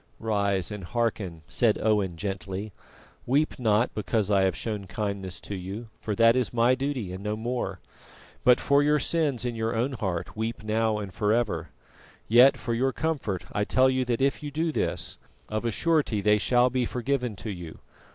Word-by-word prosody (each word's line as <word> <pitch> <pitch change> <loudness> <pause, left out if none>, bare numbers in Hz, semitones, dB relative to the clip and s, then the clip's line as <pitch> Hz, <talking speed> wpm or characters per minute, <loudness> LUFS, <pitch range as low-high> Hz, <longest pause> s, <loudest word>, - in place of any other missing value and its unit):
"Rise 100 -4 0
and 105 -2 -6
hearken," 95 -6 -2
said 115 -3 +2
Owen 105 -5 +1
gently. 95 +2 -4 0.5
"Weep 145 +3 +1
not 110 0 +2
because 105 +1 -1
I 100 -1 +4
have 95 -1 +2
shown 105 -4 -4
kindness 95 -2 -4
to - - -7
you, 100 +5 -6
for 105 - -2
that 115 +1 +5
is 125 -3 +1
my 120 +1 +4
duty 130 -8 -2
and 95 +2 -7
no 105 0 -1
more, 110 -4 -3 0.6
but 125 0 +6
for 140 0 +3
your 150 +1 +3
sins 145 -4 0
in 120 - -1
your 115 0 -2
own 120 +5 0
heart 95 -8 -3
weep 110 0 -3
now 110 0 +1
and 100 -3 -6
ever. 105 -7 +1 0.6
Yet 130 +4 +7
for 120 -2 -3
your 130 +3 +1
comfort 135 - -2
I 105 - 0
tell 130 +5 +3
you 130 0 +1
that 120 0 -1
if 135 +2 +1
you 150 - -4
do 160 +3 -1
this, - - -2 0.3
of 110 +2 -2
a - - +2
surety 150 -4 +1
they 105 +1 +3
shall 125 +3 +3
be 130 -1 +1
forgiven 125 -2 -1
to 110 +2 -6
you. 85 -4 -8
110 Hz, 185 wpm, -27 LUFS, 100-125 Hz, 0.6 s, Yet